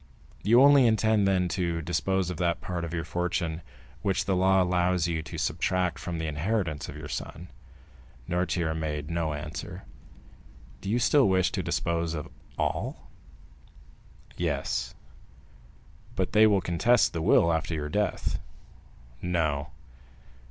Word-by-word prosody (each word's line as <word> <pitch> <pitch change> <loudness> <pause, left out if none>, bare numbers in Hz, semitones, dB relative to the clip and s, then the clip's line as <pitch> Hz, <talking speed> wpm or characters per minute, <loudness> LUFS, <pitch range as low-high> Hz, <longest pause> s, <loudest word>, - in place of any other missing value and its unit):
"You 120 +5 +5
only 140 -3 +7
intend, 110 -2 +3
then, 90 -2 +2
to 85 -1 -1
dispose 90 +3 0
of 90 - -6
that 85 -1 0
part 90 -2 -4
of 85 - -4
your 85 -1 -2
fortune 85 -1 -2 0.4
which 95 -2 0
the 95 - +1
law 95 +1 +4
allows 90 -1 +1
you 80 -2 -1
to - - -8
subtract 90 -3 0
from 85 +1 -4
the 80 - -3
inheritance 80 +1 -2
of - - -8
your - - -7
son?" 85 +3 -6 0.8
Noirtier 85 -2 0
made 75 -1 -3
no 85 -2 -1
answer. 75 +1 -7 1.0
"Do 100 - -5
you 115 - +2
still 125 -1 +4
wish 95 -2 +2
to - - -2
dispose 85 -1 -1
of 75 - -6 0.3
all?" - - -3 1.2
"Yes." - - -2 1.2
"But - - -1
they 110 +1 +7
will 100 -3 +3
contest 115 +8 +3
the 85 - -2
will 85 +1 +4
after 80 0 -1
your 75 -1 -3
death?" 105 +6 -1 0.8
"No." 80 -4 0
90 Hz, 140 wpm, -27 LUFS, 80-95 Hz, 1.2 s, only